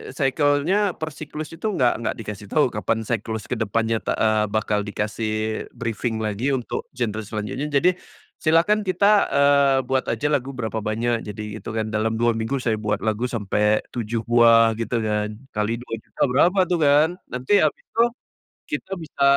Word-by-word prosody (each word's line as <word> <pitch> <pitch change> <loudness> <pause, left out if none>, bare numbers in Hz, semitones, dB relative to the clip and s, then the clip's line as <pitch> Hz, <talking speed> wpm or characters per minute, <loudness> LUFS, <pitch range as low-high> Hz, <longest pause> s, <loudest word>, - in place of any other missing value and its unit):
cycle-nya, 145 +7 +2
per 160 0 -5
siklus 155 +1 -7
itu 165 +7 -4
enggak 130 - +1
enggak 115 - -2
dikasih 105 -2 -7
tahu, 145 +1 +2
kapan 110 +1 -1
siklus 110 -1 -3
ke 125 - -4
depannya 115 +1 0
ta - - -2
eee, 110 -1 +2
bakal 105 -1 -1
dikasih 110 +1 -2
briefing 115 0 -2
lagi 115 +6 0
untuk 125 - -4
genre 110 -3 -2
selanjutnya. 110 +7 -4
Jadi, 150 +5 +3 0.5
silakan 185 +6 +3
kita, 200 +3 +4
eee, 140 -1 +4
buat 130 +1 -1
aja 145 +6 0
lagu 135 -1 -1
berapa 110 -2 -3
banyak, 115 +2 -1
jadi 105 +1 -6
itungan 110 0 -4
dalam 110 +1 0
2 120 +1 +2
minggu 115 +4 -2
saya 110 -3 0
buat 105 0 -2
lagu 110 +3 0
sampai 105 -2 +1
7 115 -1 -3
buah 115 -1 +5
gitu 115 +1 -2
kan, 105 0 -1 0.2
kali 105 +2 -1
Rp2.000.000 115 -2 -8
berapa 175 +9 +3
tuh 175 - +2
kan. 150 +2 +5 0.2
Nanti 130 +11 +1
habis 155 - +1
itu, 230 - -1 0.7
kita 195 -9 -4
bisa 160 -5 -4
115 Hz, 165 wpm, -23 LUFS, 110-145 Hz, 0.7 s, buah